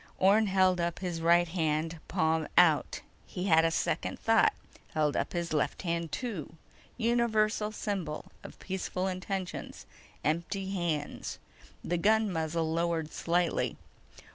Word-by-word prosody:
_ - - -22
Orne 205 +3 +4
held 185 -2 +3
up 170 0 -1
his 175 -3 -4
right 170 +1 +4
hand, 160 -1 -1
palm 160 0 +1
out. 170 -4 +4 0.3
He 180 - -5
had 160 -4 +5
a 165 - +3
second 165 - -1
thought: - - +4 0.4
held 150 -2 +2
up - - -1
his 170 -2 -2
left 150 - 0
hand, 170 -2 -2
too. 200 - -4 0.4
Universal 220 -3 +1
symbol 185 -9 -4
of - - -10
peaceful 185 -1 -3
intentions: 185 0 -4 0.4
empty 190 +5 -1
hands. 170 -6 -3 0.5
The 175 0 -1
gun 215 +1 +3
muzzle 160 0 -1
lowered 165 -2 -1
slightly. 170 0 0
175 Hz, 135 wpm, -30 LUFS, 160-195 Hz, 0.5 s, had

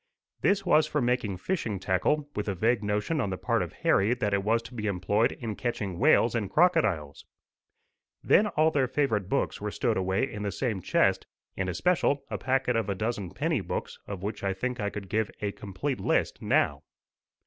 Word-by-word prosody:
This 200 0 +2
was 155 -3 +4
for 150 - -1
making 120 -6 0
fishing 115 - -2
tackle, 120 - +1
with 105 - -3
a 100 - -1
vague 115 +4 +2
notion 105 +9 0
on 105 - -1
the 95 - -3
part - - 0
of - - -3
Harry 105 +5 +2
that 105 -4 -1
it 100 -1 +1
was 115 +3 +1
to 125 +2 -11
be 110 -3 -3
employed 100 +3 +1
in 115 -4 -5
catching 105 -7 -3
whales 125 -3 +4
and 110 -5 -1
crocodiles. 105 - +2 1.0
Then 210 - +5
all 160 -4 +2
their 140 -4 +2
favourite 115 -8 0
books - - -1
were - - -2
stowed - - 0
away 95 0 0
in 105 -6 -7
the 100 -1 -2
same 110 -6 -2
chest, - - +2 0.3
in 95 -1 -2
especial 140 - +1
a - - -2
packet 130 -2 +1
of 115 -3 0
a 100 - 0
dozen 105 -2 -2
penny 145 - -1
books, - - -5
of 100 -2 -6
which 105 0 -4
I 100 -1 0
think 125 +5 -3
I 105 -1 -1
could 100 -1 -7
give 110 +2 0
a 100 -1 -2
complete 105 +8 -4
list - - 0
now. - - +1
110 Hz, 200 wpm, -28 LUFS, 100-130 Hz, 1.0 s, Then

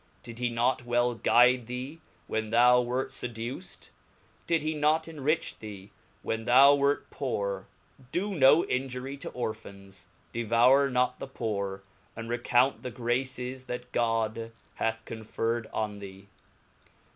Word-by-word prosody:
Did 120 -1 -9
he 125 -1 0
not 120 +2 +1
well 120 0 +1
guide 120 +1 +4
thee, 130 +6 -6 0.2
when 110 0 -2
thou 125 +2 +6
wert 125 +2 -2
refrained 125 -3 -6
to 115 - -7 0.2
fcduced? 185 - -12 0.6
Did 155 -2 +1
not 155 +2 +2
he 165 - -9
enrich 155 +1 -1
thee 105 -2 -9 0.3
when 115 0 -3
thou 135 +4 +7
wert 140 0 +1
poor? 100 -8 -3 0.4
Do 195 +4 -1
viiic - - -3
him. 175 - -5
no 135 +5 +6
injury 130 +1 -3
to - - -7
Orphans, 100 -5 -7 0.3
devoure 120 +4 +4
not 125 0 +1
thepoore, 100 -4 -4 0.3
and 115 0 -7
recount 120 +2 +2
the 125 - -5
graces 125 +1 -3
that 125 0 -6
God 115 -1 0 0.2
hath 115 0 -2
conferred 115 +1 -3
on 105 -2 -3
thee. 100 0 -11
120 Hz, 145 wpm, -28 LUFS, 115-130 Hz, 0.6 s, thou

